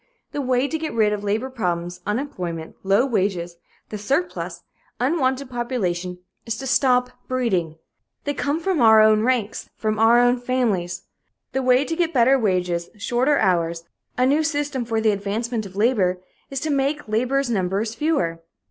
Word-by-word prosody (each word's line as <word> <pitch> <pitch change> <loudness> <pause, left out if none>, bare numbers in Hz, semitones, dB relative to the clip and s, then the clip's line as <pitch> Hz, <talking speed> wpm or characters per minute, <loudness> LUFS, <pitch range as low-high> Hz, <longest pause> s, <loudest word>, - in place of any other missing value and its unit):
The 290 - -3
way 255 0 +1
to 320 +2 -3
get 315 -6 -4
rid 215 -2 +3
of 205 -1 -4
labor 220 +6 -1
problems, 175 -6 -3
unemployment, 180 - -4
low 195 +6 +3
wages, 185 -8 -1 0.3
the 210 - -5
surplus, 275 - -2 0.4
unwanted 265 -1 0
population, 185 -8 -2 0.3
is 230 -1 -3
to 270 - -6
stop 250 -1 +2 0.2
breeding. 195 -11 0 0.5
They 290 - -1
come 290 +2 -1
from 335 -3 0
our 220 -1 +7
own 215 0 +5
ranks 230 -3 -1
from 215 -1 -2
our 225 +2 +6
own 245 0 +3
families. 225 -8 -1 0.5
The 265 - -1
way 255 +2 +3
to 325 - -2
get 335 -2 0
better 260 +2 +5
wages, 180 -5 0
shorter 250 +7 +1
hours, 170 -4 +1 0.3
a 250 - +3
new 285 +4 +3
system 290 -4 -1
for 225 -1 -1
the 220 -1 +3
advancement 215 +2 -2
of 190 - -15
labor, 200 -5 +2 0.3
is 275 - -3
to 310 0 -1
make 280 +1 0
labor's 250 +4 0
numbers 200 +2 -1
fewer. 225 - 0
235 Hz, 165 wpm, -22 LUFS, 195-265 Hz, 0.5 s, our